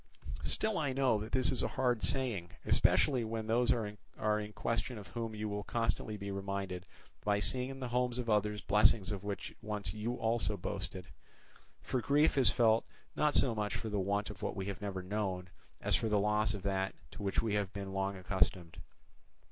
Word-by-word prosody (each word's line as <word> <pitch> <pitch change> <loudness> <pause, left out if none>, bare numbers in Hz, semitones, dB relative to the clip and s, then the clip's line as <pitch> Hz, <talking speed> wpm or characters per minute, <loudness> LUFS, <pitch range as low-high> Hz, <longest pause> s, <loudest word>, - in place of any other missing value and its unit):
Still 215 -4 +2
I 145 -4 0
know 130 -5 +2
that 110 +2 -6
this 130 -1 +4
is 130 - +2
a - - +1
hard 125 -3 +2
saying, 120 -10 +2 0.2
especially 130 -5 +3
when 110 0 -3
those 120 +2 +3
are 115 -2 +1
in 105 0 -3
question 115 +2 -2
of 105 - -10
whom 115 -2 -4
you 105 0 -3
will 105 0 -3
constantly 115 -2 -1
be 100 0 -5
reminded 95 -2 -4 0.4
by 105 0 +2
seeing 125 +5 +2
in 135 0 -7
the 125 -2 -4
homes 125 0 0
of 125 -2 -3
others 105 -1 +1
blessings 105 -1 +4
of 100 -2 -4
which 100 -1 -4
once 105 -6 -3
you 110 +3 -3
also 110 -3 0
boasted: 90 0 -5 0.8
for 130 - -1
grief 145 +5 +3
is 130 -6 +7
felt 115 -1 +4 0.3
not 150 -1 +2
so 125 -4 +4
much 105 -2 -2
for 110 - -4
the 105 -1 -1
want 100 +2 0
of 100 - -12
what - - -2
we 95 - -3
have 100 +1 -5
never 95 -2 -4
known, 95 -2 -2 0.3
as - - +1
for 110 - 0
the 105 - +3
loss 105 0 +2
of 100 - -7
that 95 -1 -1 0.2
to - - -9
which 100 +1 0
we 110 -2 -1
have 100 -2 0
been 100 -2 -6
long 95 0 -1
accustomed. 90 -2 0
105 Hz, 200 wpm, -34 LUFS, 100-115 Hz, 0.8 s, is